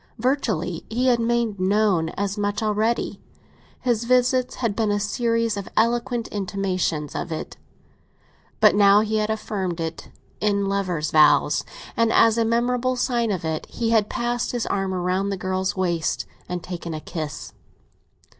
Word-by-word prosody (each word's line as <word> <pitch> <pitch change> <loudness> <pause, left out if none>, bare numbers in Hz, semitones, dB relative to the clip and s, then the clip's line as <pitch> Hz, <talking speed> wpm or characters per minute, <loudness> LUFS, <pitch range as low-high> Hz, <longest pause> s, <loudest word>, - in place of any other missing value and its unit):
Virtually, 215 - -1
he 240 +4 0
had 240 -1 +3
made 230 -3 0
known 190 -3 +2
as 200 0 -1
much 205 +1 -1
already—his 225 +2 -2
visits 250 +1 +2
had 230 -5 -1
been 220 -2 +1
a 205 0 +1
series 230 +1 0
of 200 - -5
eloquent 235 +1 +1
intimations 185 -6 -2
of 170 - -4
it. 160 - -5 1.0
But - - +6
now 200 0 +6
he 220 0 0
had 215 0 0
affirmed 195 -5 -3
it 165 0 -5 0.3
in 200 -1 +1
lover's 185 -6 -1
vows, 155 -1 +4 0.3
and, 230 -1 +2
as 225 0 +5
a 230 - +2
memorable 245 +2 +1
sign 240 -2 0
of 185 -5 -2
it, 160 -1 -3
he 230 -1 -2
had 215 -2 +3
passed 240 0 -2
his 240 -2 -1
arm 195 -1 -1
round 185 +2 -1
the 195 - -2
girl's 185 +1 -1
waist 170 -3 0 0.2
and 180 -1 -4
taken 170 -2 -5
a - - -4
kiss. 155 -1 -6
205 Hz, 155 wpm, -23 LUFS, 185-230 Hz, 1.0 s, But